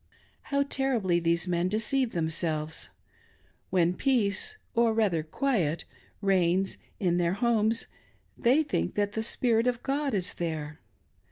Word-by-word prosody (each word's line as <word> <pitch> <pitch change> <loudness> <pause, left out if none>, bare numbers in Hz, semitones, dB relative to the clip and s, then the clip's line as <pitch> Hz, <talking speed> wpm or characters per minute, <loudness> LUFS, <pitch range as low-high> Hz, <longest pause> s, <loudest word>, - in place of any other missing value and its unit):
How 280 0 +2
terribly 245 -11 +1
these 170 +1 0
men 175 0 +1
deceive 225 +4 0
themselves! 160 -2 -2 0.8
When 175 -1 +2
peace, 250 - +1 0.2
or 230 -1 +3
rather 200 -8 +2
quiet, 165 - -1 0.4
reigns 190 -1 +2 0.2
in 175 -2 +1
their 175 0 +1
homes, 225 0 +1 0.5
they 265 +7 +3
think 290 - -2
that 205 -1 +1
the 220 - -2
Spirit 230 +1 +1
of 245 -1 -1
God 280 -2 0
is 185 -2 -1
there. 155 -3 -4
200 Hz, 125 wpm, -28 LUFS, 170-240 Hz, 0.8 s, or